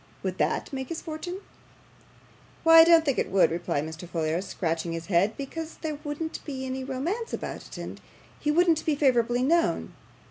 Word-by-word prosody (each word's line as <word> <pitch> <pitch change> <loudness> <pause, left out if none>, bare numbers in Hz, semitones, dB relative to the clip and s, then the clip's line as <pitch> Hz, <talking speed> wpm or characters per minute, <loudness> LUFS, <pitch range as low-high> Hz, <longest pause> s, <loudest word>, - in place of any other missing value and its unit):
Would - - -3
that - - 0
make 265 -1 -4
his 335 - -3
fortune?' 350 +4 -6 1.2
'Why, 325 0 +9
I - - +11
don't 330 -1 +6
think 275 -4 +1
it - - -1
would,' 185 -4 +4
replied 165 -4 -1
Mr. 160 +2 -8
Folair, 165 0 -1
scratching 165 -3 -2
his 165 0 -5
head, 195 +4 +2
'because 315 +4 -6
there 305 -2 -3
wouldn't 305 +2 -4
be 265 -3 -5
any 260 0 -4
romance 315 - -3
about - - -5
it, - - -10
and - - -7 0.4
he 300 - -1
wouldn't 330 0 +3
be 310 - +1
favourably 245 -3 +2
known. 335 +5 +1
270 Hz, 180 wpm, -27 LUFS, -, 1.2 s, I